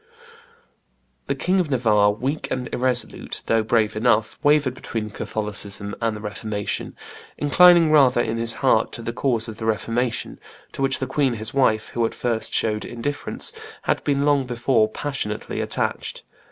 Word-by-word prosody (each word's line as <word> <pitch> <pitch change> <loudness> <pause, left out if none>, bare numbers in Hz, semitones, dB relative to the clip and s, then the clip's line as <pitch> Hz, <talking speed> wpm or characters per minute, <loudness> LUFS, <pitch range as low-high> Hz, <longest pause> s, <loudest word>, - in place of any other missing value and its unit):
The - - 0
King 185 +1 +1
of 175 -5 0
Navarre, 110 -6 +3
weak 130 +8 -3
and 125 -1 -2
irresolute 125 -1 -1
though 115 0 +2
brave 110 -1 +1
enough, 110 -1 +1
wavered 145 -3 +3
between 110 -4 -5
Catholicism 100 -1 -4
and 115 -2 0
the - - -9
Reformation, 105 -1 -4 0.4
inclining 170 +2 +6
rather 135 -5 +5
in 115 -1 0
his 115 0 0
heart 115 -4 +3
to 115 - -7
the 115 - -3
cause 120 -3 0
of 110 -1 -8
the 110 - -5
Reformation, 115 +2 -1 0.3
to - - -7
which 135 -1 +2
the 130 - -2
queen 135 -1 0
his 110 0 -4
wife, 110 -6 +2
who 120 - -1
at - - -9
first 115 -2 -1
showed 105 -1 0
indifference, 140 +5 -3 0.3
had - - 0
before 140 -1 +1
long 145 -3 +2
become 120 -2 +2
Passionately 130 -8 -3
attached. - - -3
120 Hz, 160 wpm, -23 LUFS, 110-135 Hz, 0.4 s, inclining